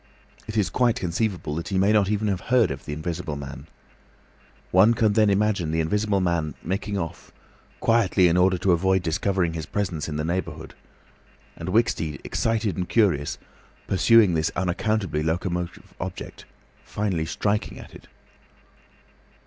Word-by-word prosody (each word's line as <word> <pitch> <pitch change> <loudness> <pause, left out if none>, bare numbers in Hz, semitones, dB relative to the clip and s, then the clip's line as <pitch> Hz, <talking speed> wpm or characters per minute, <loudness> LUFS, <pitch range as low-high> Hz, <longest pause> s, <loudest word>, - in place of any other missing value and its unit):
It 110 - -4
is 105 - +1
quite 120 -2 +2
conceivable 90 -3 -2
that 85 +2 -4
he 95 - -1
may 95 +2 +3
not 105 -3 +3
even 105 0 0
have 95 -3 -1
heard 125 -5 +4
of 70 - -7
the - - -5
Invisible 80 0 -4
Man. 70 +1 -8 1.0
One 105 +6 +5
can 110 -2 +2
then 105 -1 +4
imagine 100 -4 +1
the 80 +1 0
Invisible 100 +5 +1
Man 85 -5 -1
making 100 +3 -2
off—quietly 95 +3 -1
in 85 - +2
order 90 +1 +3
to 95 +1 +1
avoid 95 +2 +2
discovering 90 0 0
his 80 -2 -5
presence 85 -8 -2
in 75 - -4
the 75 +1 -2
neighbourhood, 90 +3 -4 0.8
and 85 +2 -6
Wicksteed, 85 - 0
excited 110 -5 -1
and 90 -1 -3
curious, 90 -11 +2 0.5
pursuing 105 0 +5
this 80 0 +1
unaccountably 95 -2 -1
locomotive 85 +2 -3
object—finally 95 -6 -5
striking 105 +5 -1
at - - -12
it. - - -14
95 Hz, 145 wpm, -24 LUFS, 80-105 Hz, 1.0 s, One